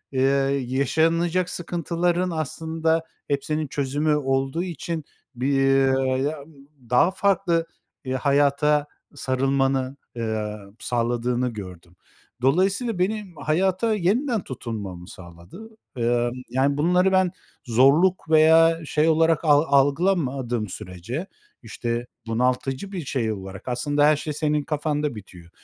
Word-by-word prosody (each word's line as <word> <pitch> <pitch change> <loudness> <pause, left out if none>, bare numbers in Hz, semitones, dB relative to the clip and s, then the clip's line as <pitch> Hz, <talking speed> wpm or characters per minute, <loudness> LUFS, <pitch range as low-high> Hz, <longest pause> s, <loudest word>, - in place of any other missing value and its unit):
ııı, 135 +1 +2
yaşanacak 160 +7 +1
sıkıntıların 175 +1 -1
aslında 160 +1 -1 0.2
hepsinin 150 +2 -1
çözümü 145 +2 0
olduğu 135 +3 0
için 170 -2 -4 0.3
bir 130 +3 0 0.7
ya 155 +1 -3 0.5
daha 125 +9 +4
farklı, 190 -4 +1 0.4
eee, 130 - -2
hayata 145 +2 +2 0.3
sarılmanı, 135 0 0 0.2
eee, 110 -2 -3 0.2
sağladığını 120 +1 -1
gördüm. 90 -5 -10 0.5
Dolayısıyla 190 - +1
benim 195 -1 -2
hayata 185 +8 +1
yeniden 220 +5 +1
tutunmamı 100 -8 -6
sağladı. 85 - -12 0.3
Emm, 120 0 +1 0.2
yani, 135 +3 +1
bunları 180 +5 +3
ben 185 -2 +3 0.3
zorluk 145 +10 +3
veya 160 +1 +5
şey 150 +1 +1
olarak 165 0 +3
al 145 -1 +5
algılamadığım 140 - +1
sürece, 105 - -6 0.4
işte, 120 +1 -4 0.2
bunaltıcı 125 - -1
bir 180 -6 -5
şey 120 -5 -1
olarak, 95 0 -8
aslında 145 +4 +1
her 150 +1 +5
şey 150 +1 -4
senin 150 0 0
kafanda 150 -2 -2
bitiyor. 90 -5 -12
145 Hz, 110 wpm, -24 LUFS, 125-165 Hz, 0.7 s, veya